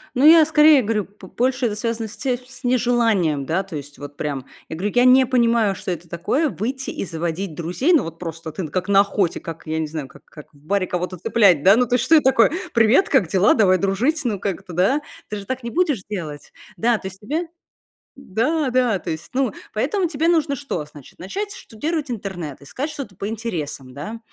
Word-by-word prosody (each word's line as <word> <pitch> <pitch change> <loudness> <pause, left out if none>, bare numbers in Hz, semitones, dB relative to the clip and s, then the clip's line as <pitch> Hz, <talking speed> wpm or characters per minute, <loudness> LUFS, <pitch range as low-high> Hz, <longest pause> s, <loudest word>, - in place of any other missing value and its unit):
Ну, 260 +3 +3
я 320 +1 +9
скорее 300 -2 +6
говорю, 215 -3 -1
п 200 -1 -15
больше 255 +5 0
это 210 - -3
с - - -7
связано 230 0 -2
с 215 - -12
те 255 -2 -1
с 250 +1 -16
нежеланием, 230 - +2
да, 170 +7 0
то 190 -4 -9
есть 145 0 -8
вот 145 0 -9
прям. 140 -3 -3 0.2
Я 160 - -6
говорю, 195 +5 -3
я 245 +1 +5
не 255 +1 +7
понимаю, 235 -5 +2
что 185 - -5
это 170 -1 -6
такое- 250 - 0
выйти 260 +5 -4
и - - -4
заводить 170 +1 -4
друзей. 180 - 0
Ну 320 - +4
вот 165 0 -8
просто 165 -2 -6
ты 160 +2 -5
как 185 +5 -3
на 195 0 +6
охоте, 200 -3 0
как 165 -1 -8
я 160 0 -1
не 155 - -1
знаю, 150 -3 -5
как - - -18
как 150 0 -14
в - - -21
баре 185 +6 -1
кого-то 180 +1 -3
цеплять, 180 -4 +3
да, 195 +2 +7
ну, 250 +2 +3
то 245 - +1
есть 250 0 +1
что 325 - +5
это 305 - +5
такое? 265 -3 +5 0.2
"Привет, 230 - +4
как 265 - +3
дела? 190 +4 +4
Давай 185 -4 +4
дружить". 220 - 0
Ну, 210 -5 -1
как 195 -1 -3
это, 180 - -11
да? 195 - +2 0.3
Ты 210 - -4
же 200 - -8
так 260 +3 -4
не 235 - -4
будешь 305 - +1
делать. 160 -8 -6 0.3
Да, 230 +6 +2
то 190 - -7
есть 190 0 -10
тебе 310 - -3 0.7
да, 270 - -1
да. 245 -5 +2
То 175 - -5
есть, 160 +1 -6
ну, 255 -5 0 0.2
поэтому 335 - 0
тебе 320 +1 0
нужно 315 -4 +2
что? 275 - -4
Значит, 150 -2 -15
начать 400 - -4
штудировать 300 - -4
интернет, 185 - -6
искать 260 - -5
что-то 270 -10 -7
по 200 - -4
интересам, 165 - -5
да. 160 - -7
210 Hz, 225 wpm, -21 LUFS, 170-255 Hz, 0.7 s, я